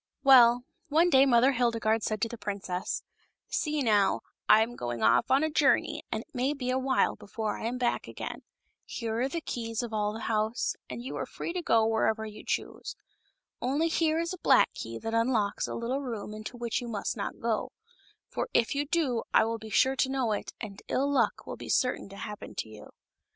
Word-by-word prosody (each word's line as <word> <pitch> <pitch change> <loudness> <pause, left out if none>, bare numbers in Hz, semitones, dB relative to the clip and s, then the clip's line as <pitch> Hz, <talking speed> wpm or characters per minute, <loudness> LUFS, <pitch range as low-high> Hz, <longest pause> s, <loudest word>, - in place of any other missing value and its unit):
Well, 245 -3 +7 0.2
one 325 +4 +3
day 270 0 +6
Mother 250 +1 +5
Hildegarde 230 -3 +1
said 215 -1 -2
to - - +2
the 235 - -7
princess: 195 -4 -4 0.5
"See, 300 -2 0
now; 205 -4 +3 0.3
I 220 +1 +8
am 240 +2 -6
going 120 - -4
off 110 +2 +4
on 270 +3 +4
a 315 - +1
journey, 290 -2 +2
and - - -2
it - - -38
may 260 +4 0
be 255 -2 -2
a 260 - +1
while 265 0 +2
before 215 +1 -4
I 225 - -2
am 245 +2 -2
back 245 -1 0
again. - - -6 0.4
Here 225 -1 -4
are 265 - +1
the 335 +3 -3
keys 230 -5 -3
of 230 -2 -6
all 210 -1 +1
of 210 - -5
the 225 - -6
house, 220 +1 0
and 235 - -6
you 260 - -5
are - - -3
free 335 - -5
to 360 - -2
go 225 -9 +3
wherever 220 0 +1
you 215 -1 -9
choose. - - -3 0.7
Only 285 +6 +1
here 320 -1 +2
is 335 +2 -1
a 370 - -8
black - - +4
key 115 0 -6
that 225 - -5
unlocks 230 -3 +1
a - - -4
little 250 +4 -2
room 225 -6 -5
into 215 +3 -7
which 235 -1 -2
you 240 - -6
must 215 -3 -3
not - - -5
go; 230 -2 -1 0.6
for - - -3
if 230 - +3
you 285 +1 -1
do 280 -8 +1
I - - +6
will 225 0 -2
be 220 0 -9
sure 260 +5 +3
to 265 - +2
know 265 -4 0
it, 210 - -3
and 205 -3 -7
ill 280 +2 +1
luck 235 -6 +1
will - - -6
be - - -9
certain 250 -6 +1
to 195 - -11
happen 210 +1 -7
to - - -3
you." 110 -1 -12
235 Hz, 220 wpm, -29 LUFS, 215-265 Hz, 0.7 s, I